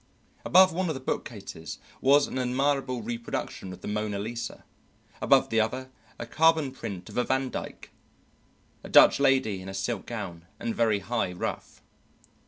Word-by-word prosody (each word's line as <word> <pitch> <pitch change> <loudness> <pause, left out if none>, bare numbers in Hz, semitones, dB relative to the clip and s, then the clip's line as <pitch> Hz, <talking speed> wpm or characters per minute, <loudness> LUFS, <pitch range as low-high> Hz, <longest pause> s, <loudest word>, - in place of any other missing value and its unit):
Above 185 0 +6
one 185 +2 -1
of 155 - -1
the - - -5
bookcases 100 - -5 0.2
was 140 +2 +5
an 130 - -4
admirable 130 -1 0
reproduction 115 -4 -4
of 90 - -10
the - - -7
"Mona 105 -1 -2
Lisa"; 115 +3 -5 0.6
above - - +4
the 115 - +3
other, 130 +4 -1 0.3
a - - -5
carbon 160 +2 +3
print 95 -8 -7
of - - -3
a - - +3
Vandyke, 130 0 -3 0.9
a - - -9
Dutch - - +7
lady 130 -8 +2
in 95 - -8
a 95 - -6
silk 100 +2 -3
gown 90 -7 -6
and 115 -1 -2
very 110 -3 +2
high 110 -1 -1
ruff. 90 - -5
120 Hz, 160 wpm, -27 LUFS, 100-135 Hz, 0.9 s, Dutch